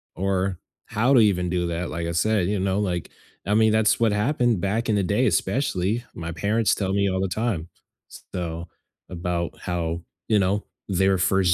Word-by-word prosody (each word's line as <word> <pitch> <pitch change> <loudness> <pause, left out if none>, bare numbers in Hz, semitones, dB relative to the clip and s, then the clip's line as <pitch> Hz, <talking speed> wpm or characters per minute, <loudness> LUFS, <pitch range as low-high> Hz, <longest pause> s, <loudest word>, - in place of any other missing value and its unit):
or 95 -1 -1 0.3
how 115 +3 +1
to 130 - +7
even 95 -5 +3
do 90 -1 0
that, 85 +1 -3
like 85 +1 -3
I - - -2
said, 100 +1 +2
you 100 0 0
know, 95 +1 0
like, 90 -5 -2 0.4
I 105 - +2
mean, 110 0 +5
that's 110 +2 +3
what 115 -2 +3
happened 120 - +1
back 105 +5 0
in 110 - +3
the 100 - +2
day, 105 +8 +2
especially. 100 - 0
My 85 0 -5
parents 105 +6 +1
tell 95 -2 -1
me 100 0 +2
all 95 0 -1
the 95 - 0
time, 95 -4 -2 0.4
s - - -12
so, 85 -1 -4 0.4
about 85 -1 -3
how, 85 -1 -2 0.3
you 110 - +4
know, 100 +2 +1 0.2
they're 95 0 +2
1st 95 -1 +3
95 Hz, 195 wpm, -24 LUFS, 90-105 Hz, 0.4 s, to